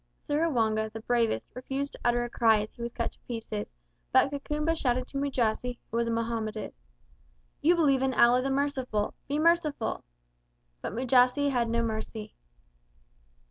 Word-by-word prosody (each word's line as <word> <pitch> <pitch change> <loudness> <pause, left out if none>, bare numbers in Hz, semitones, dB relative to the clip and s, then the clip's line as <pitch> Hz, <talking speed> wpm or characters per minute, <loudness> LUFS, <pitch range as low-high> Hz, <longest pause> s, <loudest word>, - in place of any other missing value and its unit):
Seruwanga, 230 -9 0
the 225 0 -7
bravest, 235 -1 +1
refused 270 +3 -3
to - - -8
utter 240 0 +2
a 240 - -4
cry 225 -2 +4
as 210 - -7
he - - -12
was 235 0 -3
cut 235 -1 -2
to - - -16
pieces, 220 - -5 0.4
but 275 - +4
Kakumba 300 +3 -1
shouted 255 -4 0
to 275 - -3
Mujasi, 250 -3 0
who 230 - -1
was 235 0 +1
a - - 0
Mohammedan, 230 -2 -2 0.9
"You 340 +4 +5
believe 280 -6 +3
in 265 -1 +1
Allah 245 +1 +5
the 270 - -1
Merciful. 270 -6 -1
Be 285 - -1
merciful!" 310 -7 +1 0.8
But - - -4
Mujasi 255 +3 +3
had 240 -3 +1
no 235 0 +1
mercy. 220 -1 -4
245 Hz, 160 wpm, -29 LUFS, 225-280 Hz, 0.9 s, You